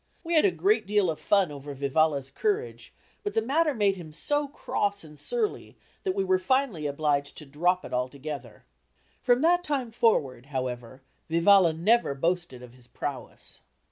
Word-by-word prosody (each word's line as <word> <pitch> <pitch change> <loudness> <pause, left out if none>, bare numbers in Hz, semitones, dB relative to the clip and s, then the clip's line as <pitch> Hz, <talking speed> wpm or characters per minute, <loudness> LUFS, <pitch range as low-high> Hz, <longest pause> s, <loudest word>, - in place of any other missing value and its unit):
We 340 0 -3
had 315 +1 +5
a - - +6
great 400 +4 +1
deal 205 -4 +2
of 155 - -7
fun 195 -6 +2
over 145 0 -8
Vivalla's 140 0 +1
courage, 435 +2 -2 0.3
but 410 0 -4
the - - +3
matter 300 +4 +1
made 200 -3 +2
him 165 -3 -9
so 290 - -1
cross 205 -7 -2
and 150 -2 -14
surly 455 -4 -3 0.2
that 375 -1 -2
we 390 - +1
were 375 -1 +2
finally 260 - 0
obliged 145 -1 -1
to 150 - -8
drop 175 +6 0
it - - -9
altogether. 135 +3 -5 0.6
From 245 +1 +3
that 350 +2 +3
time 270 -7 -2
forward, 140 - +1
however, 130 -2 -5 0.3
Vivalla 170 +1 +5
never 185 -1 +2
boasted 165 -4 -2
of 125 -1 -13
his 125 -1 -18
prowess. 135 -1 -7
175 Hz, 170 wpm, -27 LUFS, -, 0.6 s, a